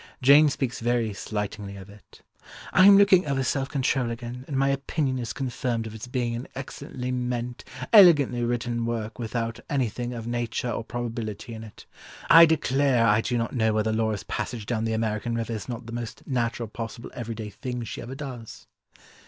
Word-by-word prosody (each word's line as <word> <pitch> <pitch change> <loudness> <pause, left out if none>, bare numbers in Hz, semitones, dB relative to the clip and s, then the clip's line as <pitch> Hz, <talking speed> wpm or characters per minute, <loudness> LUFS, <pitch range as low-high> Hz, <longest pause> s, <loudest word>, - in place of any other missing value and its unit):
Jane 145 +3 +7
speaks 135 -3 -2
very 115 -2 0
slightingly 105 -1 -5
of 95 -1 -10
it: 105 -1 -17 0.5
"I 185 - +7
am 200 -1 +9
looking 195 -4 +5
over 135 -1 0
Self 135 +1 -1
Control 130 -3 0
again, 120 +2 -6
and 140 - -2
my 135 +1 +3
opinion 140 -1 -1
is 120 -1 -4
confirmed 125 -3 -2
of 110 - -7
its 110 +2 -8
being 120 -2 -1
an 120 +3 -6
excellently 130 -1 -6
meant, 125 -1 -3 0.3
elegantly 150 - +7
written 120 -1 -1
work, 115 0 -4
without 115 0 -3
anything 125 -4 -1
of 115 -2 -6
nature 120 0 -2
or 115 - -3
probability 115 -1 -5
in 110 0 -7
it. 110 -3 -13 0.5
I 165 0 +10
declare 135 -6 +2
I 105 0 +4
do 120 +1 -1
not 115 0 -2
know 110 -2 +2
whether 110 0 +1
Laura's 110 -2 0
passage 115 -5 -4
down 115 0 -1
the 115 - -1
American 110 +1 -1
river 115 0 -2
is 110 +2 -6
not 120 -1 -5
the 115 - -8
most 120 -1 -6
natural 120 -3 -1
possible 115 +2 -7
every 115 -1 -5
day 110 -2 -6
thing 125 +1 -5
she 115 - -6
ever 125 +3 -7
does." 130 -6 -8
120 Hz, 185 wpm, -26 LUFS, 115-130 Hz, 0.5 s, I